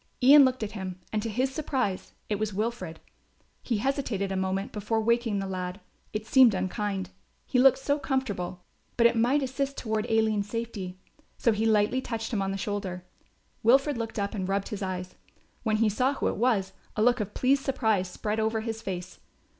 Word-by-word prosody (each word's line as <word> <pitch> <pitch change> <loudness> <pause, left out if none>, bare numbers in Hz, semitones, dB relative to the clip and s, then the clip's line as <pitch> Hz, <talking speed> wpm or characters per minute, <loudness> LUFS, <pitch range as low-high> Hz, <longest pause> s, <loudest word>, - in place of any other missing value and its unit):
Ian 280 +3 +9
looked 255 -2 0
at 210 - -3
him 185 -3 -6
and 215 - +1
to 225 - -3
his 255 +5 0
surprise 255 -11 -2
it 210 -2 -1
was 215 -2 -2
Wilfred. 210 -6 -3 0.6
He 235 - -1
hesitated 225 -5 -1
a - - -1
moment 190 +1 -1
before 215 +2 -1
waking 230 -1 +1
the 195 - -2
lad; 185 0 -4 0.3
it 215 0 -4
seemed 250 -4 +6
unkind, 190 0 -2 0.3
he 250 - +1
looked 265 0 +7
so 285 +2 0
comfortable; 205 -11 -2 0.3
but 235 - +4
it 235 0 +5
might 250 +5 +3
assist 270 +1 -2
toward 220 0 -2
Aline's 220 -2 +2
safety. 210 -5 -4 0.4
So 230 - +3
he 220 +1 +1
lightly 220 +4 +3
touched 225 -2 -4
him 205 - +1
on 195 - -1
the 195 - -2
shoulder. 195 -3 -4 0.6
Wilfred 270 +5 +4
looked 225 0 -4
up 200 +1 -1
and 190 -3 -3
rubbed 195 0 -1
his 210 -3 -5
eyes. 185 -1 -4 0.5
When 215 -2 +1
he 225 0 +3
saw 255 +7 +1
who - - 0
it - - -3
was 205 -5 +1 0.2
a 215 - +2
look 245 +1 +4
of 210 -1 -4
pleased 270 +2 +2
surprise 220 -8 +1
spread 210 +4 -3
over 220 0 0
his 225 0 -4
face. 185 -2 -6
220 Hz, 195 wpm, -28 LUFS, 195-245 Hz, 0.6 s, Ian